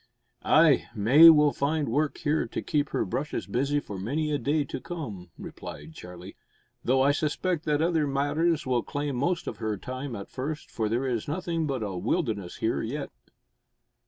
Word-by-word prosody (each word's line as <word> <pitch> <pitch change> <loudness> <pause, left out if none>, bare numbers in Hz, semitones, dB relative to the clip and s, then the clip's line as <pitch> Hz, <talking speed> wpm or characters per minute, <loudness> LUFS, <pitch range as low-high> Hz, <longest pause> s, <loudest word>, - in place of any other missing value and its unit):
"Ay, 155 -3 +4
May 130 +11 +8
will 150 -2 +6
find 145 +1 0
work 145 +5 0
here 155 +1 0
to - - -4
keep 145 -3 0
her - - -1
brushes 135 +9 -3
busy 140 +4 0
for 100 -8 -7
many 150 +10 -1
a 145 - 0
day 150 +2 +1
to 130 - -6
come," 110 - -7
replied 75 +2 -9
Charlie, 90 +3 -10 0.5
"though 130 +2 +3
I 140 - +5
suspect 155 +3 -1
that 150 0 +1
other 165 -3 +1
matters 150 +4 +1
will 125 -2 +1
claim 145 -1 -3
most 170 +7 0
of 110 - -5
her 110 -1 -2
time 130 +4 -6
at 100 -1 -7
first, 150 +4 -5
for 110 -2 -1
there 120 +4 0
is 120 -4 -2
nothing 165 0 -2
but 130 -5 -2
a 100 -3 -4
wilderness 105 - -2
here 110 - 0
yet." 140 +6 -4
140 Hz, 180 wpm, -27 LUFS, 115-155 Hz, 0.5 s, May